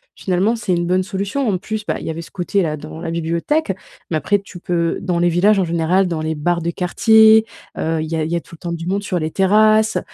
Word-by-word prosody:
finalement, 195 Hz, +5 st, 0 dB
c'est 210 Hz, -5 st, -2 dB
une 175 Hz, 0 st, 0 dB
bonne 185 Hz, +1 st, +2 dB
solution. 200 Hz, +7 st, -2 dB
En 185 Hz, -4 st, 0 dB
plus, 215 Hz, +1 st, -5 dB
bah, -, -, -2 dB
il -, -, -8 dB
y -, -, -2 dB
avait 165 Hz, +1 st, -5 dB
ce -, -, -14 dB
côté-là 175 Hz, -3 st, -1 dB
dans 155 Hz, +2 st, -9 dB
la 165 Hz, -, -4 dB
bibliothèque 170 Hz, -, -1 dB, 0.4 s
mais 160 Hz, -, 0 dB
après 200 Hz, +7 st, +1 dB
tu 195 Hz, -2 st, -12 dB
peux 170 Hz, -2 st, -1 dB
dans 180 Hz, -2 st, -1 dB
les 175 Hz, -, +3 dB
villages 195 Hz, +4 st, +3 dB
en -, -, +2 dB
général, 170 Hz, +3 st, +1 dB
dans 165 Hz, -2 st, -3 dB
les 160 Hz, 0 st, -2 dB
bars 170 Hz, +3 st, -1 dB
de 170 Hz, -, -1 dB
quartier, 220 Hz, +5 st, +5 dB, 0.3 s
heu, 160 Hz, 0 st, -1 dB
il 155 Hz, -, -4 dB
y -, -, 0 dB
a 160 Hz, -, 0 dB
il 160 Hz, -, -3 dB
y -, -, +1 dB
a 170 Hz, -, -1 dB
tout 170 Hz, -, -14 dB
le -, -, -21 dB
temps 170 Hz, -, -5 dB
du 165 Hz, 0 st, -5 dB
monde 200 Hz, +2 st, -1 dB
sur 180 Hz, -3 st, -2 dB
les 155 Hz, -, -2 dB
terrasses 215 Hz, +4 st, +3 dB
180 Hz, 265 wpm, -19 LUFS, 165-200 Hz, 0.4 s, quartier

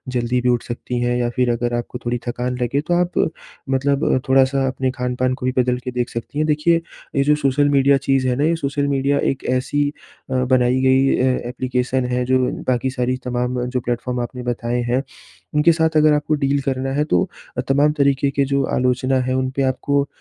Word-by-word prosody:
जल्दी 120 Hz, +1 st, +1 dB
भी 125 Hz, -, +1 dB
उठ 120 Hz, -1 st, +1 dB
सकती 120 Hz, +1 st, -4 dB
हैं 120 Hz, 0 st, +1 dB
या 120 Hz, -1 st, 0 dB
फ़िर 125 Hz, -1 st, +2 dB
अगर 120 Hz, +1 st, -1 dB
आपको 120 Hz, +1 st, -4 dB
थोड़ी 120 Hz, +1 st, 0 dB
थकान 125 Hz, +1 st, -2 dB
लगे 125 Hz, +3 st, 0 dB
तो -, -, +3 dB
आप 175 Hz, 0 st, +1 dB, 0.6 s
मतलब 140 Hz, +2 st, +1 dB, 0.2 s
थोड़ा-सा 135 Hz, 0 st, +3 dB
अपने 130 Hz, 0 st, -1 dB
खान-पान 125 Hz, 0 st, -1 dB
को 130 Hz, -1 st, -5 dB
भी 130 Hz, -, +2 dB
बदल 125 Hz, 0 st, +2 dB
के 125 Hz, -, -4 dB
देख 125 Hz, -1 st, -2 dB
सकती 115 Hz, +5 st, -6 dB
हैं। 155 Hz, -, +2 dB
देखिए 155 Hz, +3 st, +2 dB, 0.3 s
ये 140 Hz, -, +3 dB
जो 150 Hz, +1 st, +3 dB
सोशल 145 Hz, 0 st, +2 dB
मीडिया 140 Hz, 0 st, +4 dB
चीज़ 135 Hz, -1 st, +1 dB
है 125 Hz, -, +1 dB
ना 140 Hz, -, 0 dB
ये 165 Hz, +1 st, +2 dB
सोशल 140 Hz, -2 st, -1 dB
मीडिया 140 Hz, 0 st, +1 dB
एक 135 Hz, -, -7 dB
ऐसी 135 Hz, +3 st, 0 dB, 0.4 s
अ, -, -, 0 dB
बनाई 130 Hz, 0 st, +2 dB
गई 130 Hz, +1 st, +3 dB
अ, 130 Hz, -1 st, 0 dB
एप्लीकेशन 125 Hz, 0 st, -1 dB
है 125 Hz, 0 st, +1 dB
जो 130 Hz, +1 st, +2 dB, 0.3 s
बाकी 130 Hz, 0 st, +1 dB
सारी 125 Hz, 0 st, -1 dB
तमाम 125 Hz, 0 st, -1 dB
जो 125 Hz, +1 st, -2 dB
प्लेटफॉर्म 125 Hz, +1 st, -3 dB
आपने 125 Hz, +1 st, -6 dB
बताए 120 Hz, 0 st, -2 dB
हैं। 130 Hz, +2 st, +1 dB, 0.5 s
उनके 150 Hz, +3 st, +5 dB
साथ 160 Hz, 0 st, +2 dB
अगर 155 Hz, 0 st, +5 dB
आपको 150 Hz, +1 st, 0 dB
डील 140 Hz, -1 st, 0 dB
करना 135 Hz, -1 st, -2 dB
है 145 Hz, +2 st, +1 dB
तो 155 Hz, -, +2 dB, 0.3 s
अ, -, -, +1 dB
तमाम 140 Hz, +2 st, +3 dB
तरीके 140 Hz, 0 st, +2 dB
के 140 Hz, 0 st, +1 dB
जो 140 Hz, 0 st, 0 dB
आलोचना 130 Hz, +1 st, +1 dB
है 130 Hz, 0 st, -1 dB
उनपे 130 Hz, +1 st, -1 dB
आपको 140 Hz, +2 st, 0 dB
130 Hz, 210 wpm, -20 LUFS, 125-140 Hz, 0.6 s, उनके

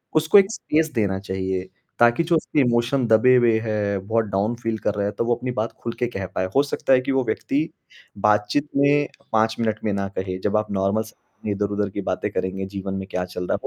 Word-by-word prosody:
उसको 160 Hz, +6 st, +5 dB
एक 195 Hz, +1 st, +5 dB
स्पेस 155 Hz, -6 st, 0 dB
देना 100 Hz, -5 st, 0 dB
चाहिए 95 Hz, -1 st, -3 dB, 0.3 s
ताकि 120 Hz, +7 st, +5 dB
जो 170 Hz, +1 st, +2 dB
उसकी 155 Hz, -, 0 dB
इमोशन 120 Hz, +1 st, +2 dB
दबे 115 Hz, +3 st, +5 dB
हुए 120 Hz, -3 st, +4 dB
हैं, 105 Hz, -3 st, -2 dB
बहुत 115 Hz, 0 st, +1 dB
डाउन 105 Hz, +3 st, -1 dB
फ़ील 115 Hz, -1 st, -1 dB
कर -, -, 0 dB
रहा 100 Hz, -1 st, -1 dB
है 100 Hz, -, -1 dB
तो 115 Hz, -, 0 dB
वो 120 Hz, 0 st, +2 dB
अपनी 125 Hz, +1 st, -4 dB
बात 110 Hz, +2 st, -1 dB
खुल 115 Hz, -, -3 dB
के 120 Hz, -, +1 dB
कह 95 Hz, -, -2 dB
पाए। 95 Hz, -, 0 dB
हो 140 Hz, -, +5 dB
सकता 140 Hz, -1 st, 0 dB
है 130 Hz, -, +5 dB
कि 135 Hz, +1 st, -2 dB
वो 135 Hz, -1 st, +2 dB
व्यक्ति 145 Hz, +6 st, -1 dB, 0.5 s
बात-चीत 105 Hz, +7 st, +2 dB
में 145 Hz, +1 st, +4 dB, 0.2 s
5 110 Hz, 0 st, +2 dB
मिनट 110 Hz, -2 st, 0 dB
में 110 Hz, -, 0 dB
ना 100 Hz, 0 st, -1 dB
कहे, 95 Hz, -1 st, -2 dB
जब 105 Hz, +2 st, 0 dB
आप 105 Hz, -, -2 dB
नॉर्मल 100 Hz, +2 st, +1 dB
स 110 Hz, -, -14 dB, 0.3 s
अपनी 105 Hz, -, -2 dB
इधर-उधर 100 Hz, 0 st, -1 dB
की 100 Hz, +1 st, -4 dB
बातें -, -, -2 dB
करेंगे, 95 Hz, +1 st, -2 dB
जीवन 95 Hz, 0 st, -5 dB
में 95 Hz, 0 st, -4 dB
क्या 90 Hz, 0 st, -1 dB
चल 90 Hz, 0 st, -6 dB
रहा -, -, 0 dB
है -, -, +1 dB
110 Hz, 235 wpm, -23 LUFS, 100-125 Hz, 0.5 s, उसको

